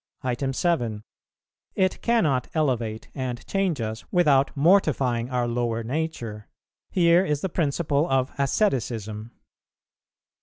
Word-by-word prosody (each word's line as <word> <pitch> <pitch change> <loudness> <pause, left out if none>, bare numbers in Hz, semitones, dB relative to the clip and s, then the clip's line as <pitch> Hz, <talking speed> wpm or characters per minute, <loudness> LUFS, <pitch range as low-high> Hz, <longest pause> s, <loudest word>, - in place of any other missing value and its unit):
7. 120 -9 -1 0.7
It 185 -1 +1
cannot 155 - +2
elevate 120 -8 -1
and 125 -3 -4
change 195 -6 0
us 110 0 -4
without 145 -6 +4
mortifying 140 -8 +3
our 125 -2 0
lower 120 -1 -1
nature: 120 -6 -4 0.4
here 170 0 +4
is 150 -5 -1
the 190 - -2
principle 150 -1 0
of 135 0 +1
asceticism. 115 - -1
135 Hz, 105 wpm, -25 LUFS, 115-165 Hz, 0.7 s, without